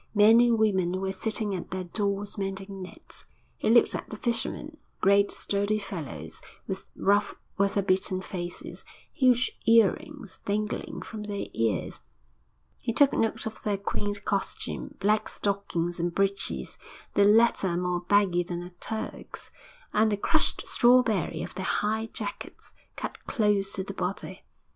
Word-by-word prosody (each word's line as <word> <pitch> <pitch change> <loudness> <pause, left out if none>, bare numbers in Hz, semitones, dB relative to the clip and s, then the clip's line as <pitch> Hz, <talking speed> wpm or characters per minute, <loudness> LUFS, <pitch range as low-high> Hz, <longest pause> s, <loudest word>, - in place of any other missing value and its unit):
Men 215 +3 +7
and 240 -1 +5
women 190 -4 +2
were 190 0 -1
sitting 215 +1 -2
at 180 - -5
their 185 0 -3
doors 200 +2 -2
mending 195 -1 -4
nets. 185 - -11 0.3
He - - +1
looked 235 +1 +6
at - - -4
the 215 - -6
fishermen, 240 +7 -2 0.2
great, 200 +1 +4
sturdy 205 +1 0
fellows, 145 - -3 0.2
with - - -5
rough, 205 +1 +2 0.2
weather 200 0 +2
beaten 185 0 +1
faces, 175 -2 -6 0.3
huge 255 -2 +3 0.2
earrings 230 - +2
dangling 210 +1 -2
from 220 -2 -7
their 205 -1 -4
ears. 110 -4 -1 0.8
He 230 - -1
took 285 +3 +5
note 225 0 0
of 220 -1 -6
their 205 -2 0
quaint 205 +1 -3
costume 200 -2 -3
black 210 +2 +2
stockings 180 -4 -2
and 175 +1 0
breeches, 195 0 -1 0.3
the 205 - +4
latter 205 -4 +4
more 180 0 0
baggy 185 -1 +3
than 175 0 -4
a 175 - -9
Turk's, 220 +5 -6 0.4
and 215 +1 +4
the 205 - +1
crushed - - +2
strawberry 240 -9 +3
of - - -7
their 185 - -4
high 220 +3 0
jackets, 205 -2 -6 0.2
cut - - -6
close 205 -5 +2
to 190 - -2
the 200 - -6
body. 195 +2 -4
200 Hz, 145 wpm, -28 LUFS, 185-215 Hz, 0.8 s, Men